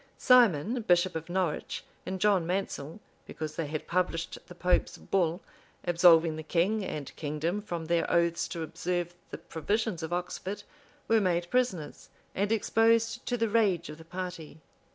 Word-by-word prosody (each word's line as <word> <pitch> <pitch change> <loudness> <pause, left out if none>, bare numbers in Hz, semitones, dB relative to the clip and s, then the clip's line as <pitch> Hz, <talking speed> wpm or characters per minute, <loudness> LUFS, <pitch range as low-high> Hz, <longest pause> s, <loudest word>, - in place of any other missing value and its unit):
[] - - -37
Simon, 240 - +4
bishop 180 -3 +2
of 160 +1 -5
Norwich, 175 -4 -2 0.2
and 190 0 -3
John 195 -4 +3
Mansel, 180 -3 -3 0.3
because 155 -1 -6
they 165 - -2
had 155 +1 -4
published 170 -2 -1
the 180 - -11
pope's 180 0 +1
bull, 175 -2 0 0.4
absolving 170 -2 +5
the - - -4
king 180 +7 +1
and 150 -6 -5
kingdom 160 +6 -2
from 175 -6 -5
their 170 +1 +1
oaths 170 0 +2
to 165 - -4
observe 175 +2 -3 0.2
the - - -6
provisions 200 +3 -2
of 160 +1 -5
Oxford, 180 +3 -4 0.4
were 225 -1 +4
made 175 -2 0
prisoners, 230 -12 -1 0.2
and 200 +2 0
exposed 225 +1 +2
to 245 - 0
the 230 0 +1
rage 200 -7 +2
of 150 +1 -9
the - - -11
party. 180 -3 -6
175 Hz, 160 wpm, -29 LUFS, 165-205 Hz, 0.4 s, absolving